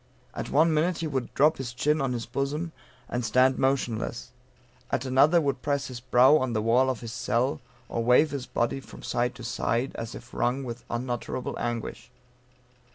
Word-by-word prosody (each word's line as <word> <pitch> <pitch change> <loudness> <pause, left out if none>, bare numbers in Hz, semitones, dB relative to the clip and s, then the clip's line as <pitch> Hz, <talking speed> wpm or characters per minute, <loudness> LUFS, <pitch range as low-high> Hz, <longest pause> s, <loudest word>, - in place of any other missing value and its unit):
At - - -5
one 160 +3 +4
minute 165 +3 +1
he 165 - -3
would 135 -6 -2
drop 150 +3 +4
his 125 -2 -5
chin 150 +5 +1
on 135 -2 0
his 115 -2 -3
bosom, 150 +5 -2 0.4
and 120 0 -2
stand 130 +4 +3
motionless; 125 -3 -1 0.6
at 130 - -1
another 140 +6 +5
would 140 -5 -1
press 140 -2 -1
his 125 -2 -6
brow 130 +4 +5
to 130 - -1
the 110 - +1
wall 125 +4 +4
of 130 - -2
his 115 -1 -6
cell, 125 +4 0 0.3
or 115 - -2
wave 125 +6 +5
his 140 -3 -4
body 120 +3 -1
from - - -13
side 125 +1 -1
to 125 - -10
side, 120 +2 -1
as 115 +1 -6
if 120 +1 -12
wrung 130 +3 0
with 120 -1 -7
unutterable 120 +1 -3
anguish. 120 0 -4
130 Hz, 185 wpm, -27 LUFS, 120-140 Hz, 0.6 s, another